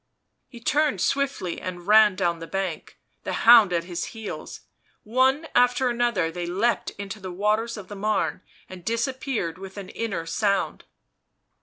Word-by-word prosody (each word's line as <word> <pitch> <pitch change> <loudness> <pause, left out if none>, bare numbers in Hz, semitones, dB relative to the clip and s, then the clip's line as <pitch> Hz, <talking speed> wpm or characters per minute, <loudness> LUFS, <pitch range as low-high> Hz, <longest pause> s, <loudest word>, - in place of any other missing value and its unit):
He 240 - -12
turned 290 -2 +1
swiftly 270 -5 -1
and 175 -1 -6
ran 210 -1 +6
down 175 -3 0
the 165 - -8
bank, 190 -4 -4 0.3
the - - -3
hound 225 -5 +8
at 170 -1 0
his 175 0 -4
heels; 220 -2 -7 0.4
one 260 +7 +2
after 245 +1 +3
another 235 -8 0
they 175 +1 -4
leaped 205 +7 0
into 200 +1 -6
the 185 -2 -7
waters 215 +5 0
of 200 -3 -9
the 205 - -8
Marne 210 -2 -1 0.3
and 185 -2 -11
disappeared 230 - -2
with 195 +1 -10
an 195 -2 -7
inner 195 -8 -3
sound. 200 +3 -1
205 Hz, 155 wpm, -25 LUFS, 180-235 Hz, 0.4 s, hound